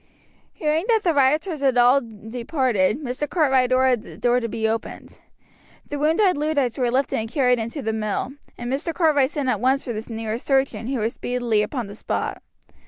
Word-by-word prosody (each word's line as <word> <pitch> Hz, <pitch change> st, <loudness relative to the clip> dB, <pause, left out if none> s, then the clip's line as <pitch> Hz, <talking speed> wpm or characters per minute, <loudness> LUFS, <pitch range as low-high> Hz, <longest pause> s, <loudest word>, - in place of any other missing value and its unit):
Hearing 310 Hz, +3 st, 0 dB
that 450 Hz, -3 st, +3 dB
the 340 Hz, -, +2 dB
rioters 305 Hz, +4 st, +2 dB
had 265 Hz, -3 st, +2 dB
all 245 Hz, +3 st, +5 dB
departed, 230 Hz, -, -1 dB
Mr. 260 Hz, +3 st, -3 dB
Cartwright 265 Hz, -7 st, +2 dB
ordered 255 Hz, -2 st, +3 dB
the -, -, -12 dB
door 245 Hz, 0 st, +2 dB
to 230 Hz, -, -3 dB
be 220 Hz, 0 st, -1 dB
opened. 225 Hz, +1 st, -5 dB, 0.7 s
The 290 Hz, -, -4 dB
wounded 325 Hz, +3 st, +2 dB
Luddites 290 Hz, -6 st, 0 dB
were 245 Hz, -1 st, +2 dB
lifted 260 Hz, +3 st, 0 dB
and 220 Hz, 0 st, -4 dB
carried 250 Hz, -3 st, +2 dB
into 230 Hz, +6 st, -4 dB
the 220 Hz, 0 st, -1 dB
mill, 215 Hz, +3 st, -2 dB, 0.3 s
and 240 Hz, +1 st, -4 dB
Mr. 320 Hz, +4 st, -2 dB
Cartwright 300 Hz, -6 st, +3 dB
sent 290 Hz, -3 st, -3 dB
at 255 Hz, -, 0 dB
once 265 Hz, +2 st, +2 dB
for 240 Hz, -, -4 dB
the 220 Hz, +2 st, -6 dB
nearest 225 Hz, +1 st, -4 dB
surgeon, 270 Hz, -4 st, +1 dB
who 265 Hz, 0 st, -1 dB
was 225 Hz, +2 st, -1 dB
speedily 245 Hz, -4 st, 0 dB
upon 240 Hz, +3 st, -3 dB
the 200 Hz, -, -9 dB
spot. 210 Hz, -, -3 dB
255 Hz, 190 wpm, -23 LUFS, 230-290 Hz, 0.7 s, all